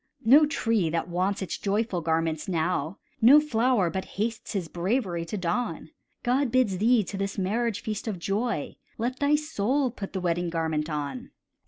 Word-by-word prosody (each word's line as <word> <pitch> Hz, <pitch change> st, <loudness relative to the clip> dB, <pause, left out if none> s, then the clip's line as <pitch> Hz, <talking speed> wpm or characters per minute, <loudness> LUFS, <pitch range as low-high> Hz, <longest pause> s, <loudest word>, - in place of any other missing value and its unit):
No 290 Hz, +6 st, +7 dB
tree 225 Hz, -, +1 dB
that 165 Hz, +1 st, -2 dB
wants 190 Hz, +3 st, 0 dB
its 185 Hz, -, -4 dB
joyful 200 Hz, -2 st, 0 dB
garments 160 Hz, -1 st, -1 dB
now, 170 Hz, -1 st, -1 dB, 0.2 s
No 260 Hz, +7 st, +9 dB
flower 235 Hz, -, +1 dB
but 190 Hz, +2 st, -3 dB
hastes 220 Hz, +2 st, -2 dB
his 190 Hz, -5 st, -2 dB
bravery 175 Hz, -1 st, -1 dB
to 190 Hz, +6 st, -4 dB
don; 175 Hz, -2 st, -2 dB, 0.3 s
God 255 Hz, +1 st, +1 dB
bids 225 Hz, -8 st, +2 dB
thee 230 Hz, +1 st, +4 dB
to 195 Hz, +2 st, -6 dB
this 195 Hz, +1 st, -3 dB
marriage 210 Hz, +2 st, -1 dB
feast 215 Hz, +1 st, -4 dB
of 210 Hz, -4 st, -2 dB
joy, 200 Hz, 0 st, -2 dB, 0.2 s
Let 245 Hz, +3 st, -2 dB
thy 285 Hz, +1 st, +3 dB
soul 280 Hz, -3 st, 0 dB
put 200 Hz, -5 st, -7 dB
the 190 Hz, -, -2 dB
wedding 175 Hz, -1 st, 0 dB
garment 160 Hz, -2 st, -1 dB
on. 145 Hz, -4 st, -4 dB
200 Hz, 170 wpm, -27 LUFS, 170-235 Hz, 0.3 s, No